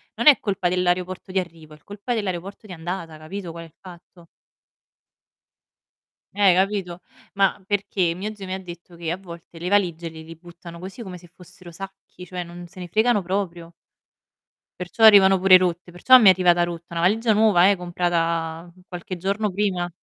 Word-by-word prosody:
non - - -1
è 290 - +9
colpa 195 -3 -2
dell'aeroporto 180 +1 -2
di 190 - +1
arrivo, 165 -3 -9
è - - -14
l 150 - -32
colpa 205 +4 -5
dell'aeroporto 195 -1 -5
di 185 - -9
andata, 170 -1 -6
capito 175 +3 -8
qual 165 0 -9
è - - -12
il 155 - -24
fatto? 175 -1 -15 2.1
Eh, 195 -2 +4
capito. 190 -2 -1 0.3
Ma 195 0 +1
perché 195 -3 -1
mio 200 +5 -6
zio 195 -2 -9
mi 185 - -5
ha 190 - -4
detto 175 -1 -12
che 165 -1 -4
a 175 - -3
volte 170 -2 -13
le 175 +2 -4
valigie 175 -4 0
le 160 0 -11
li 165 +1 -11
buttano 170 0 -13
così 190 +6 -9
come 185 -5 -8
se 175 - -17
fossero 180 0 -15
sacchi, 195 0 -11
cioè 180 0 -6
non 175 0 -11
se 185 - -15
ne 180 - -7
fregano 220 +3 +2
proprio 175 -2 -4 1.1
perciò 180 +5 -4
arrivano 195 -3 +7
pure 185 0 +7
rotte, 180 -1 +1
perciò 255 +9 +6
mi 225 - +3
è - - +10
arrivata 175 -1 +3
rotta, 170 0 -9
una - - -2
valigia 220 +6 +2
nuova, 205 -4 +4
eh, 200 - +2
comprata 170 -1 -2 0.2
qualche 180 0 -7
giorno 200 +4 -2
prima. 185 -2 -2
180 Hz, 185 wpm, -22 LUFS, 170-195 Hz, 2.1 s, è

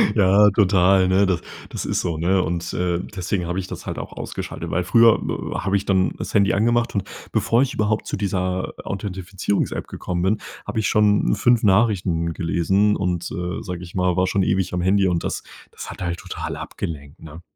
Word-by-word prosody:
Ja, 105 0 +6
total, 95 -2 +4
ne? 95 +2 +4
Das 95 -3 0 0.3
das - - -5
ist - - 0
so, 85 -2 -2
ne? 90 +4 +2
Und, 85 +2 -3
äh, 90 -1 0 0.2
deswegen 90 -1 -2
habe 90 +2 -2
ich 90 - -5
das - - -8
halt - - -4
auch - - -7
ausgeschaltet, - - -6
weil 90 +3 0
früher 115 +4 +5
w - - -4
w - - -1
habe 95 +1 0
ich 100 - -4
dann 95 -2 +2
das - - -6
Handy 100 -2 +3
angemacht 120 +3 +1
und 100 - +1 0.3
bevor 115 +2 +2
ich 140 +1 0
überhaupt 110 0 0
zu - - -2
dieser 95 -2 -2
Authentifizierungs-App 95 0 -3
gekommen 90 -1 -4
bin, 105 +3 +2 0.3
habe 110 +2 -2
ich 110 - +1
schon 105 0 +3
5 120 +2 +3
Nachrichten 95 -5 +2
gelesen 95 +5 +1
und, 90 -2 -2
äh, 90 -1 -4
sage 90 -1 -6
ich 85 - -11
mal, 90 -1 +1
war 90 0 +3
schon 100 0 +1
ewig 95 -1 0
am 90 - 0
Handy 95 +2 +3
und 85 -2 0
das - - -3 0.3
das - - -9
hat - - -10
halt 85 -1 -2
total - - -5
abgelenkt, 70 -2 -7
ne? 80 +1 -11
95 Hz, 205 wpm, -22 LUFS, 90-100 Hz, 0.3 s, Ja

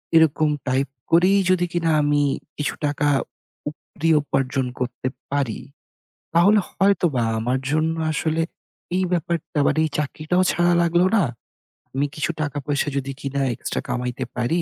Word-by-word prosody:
এরকম 155 -1 +4 0.2
টাইপ 130 +2 +1 0.2
করেই 185 +4 +5
যদি 180 -1 +3
কিনা 170 -1 +1
আমি 145 0 +2 0.4
কিছু 150 - -1
টাকা, 145 0 0 0.6
উপরি 155 +1 -4
উপার্জন 135 -2 0
করতে 125 0 -3 0.2
পারি, 140 -6 -1 0.8
তাহলে 200 +5 +6
হয়তোবা 175 -10 +2 0.2
আমার 125 +4 0
জন্য 160 +1 +1 0.2
আসলে 160 +1 0 0.5
এই 185 - +2
ব্যাপারটা 165 -2 -1
বা - - +4
মানে 155 - +2
এই 155 - -1
চাকরিটাও 155 +5 0
ছাড়া 175 0 +3
লাগলো 170 +1 +3
না। 200 - +4 0.7
আমি 140 +2 +1
কিছু 155 +2 -1
টাকা 145 -1 -2
পয়সা 145 -1 0
যদি 135 0 -2
কিনা 140 0 -2
এক্সট্রা 120 - -3
কামাইতে 125 +1 -2
পারি, 125 +8 +1
150 Hz, 145 wpm, -23 LUFS, 135-170 Hz, 0.8 s, তাহলে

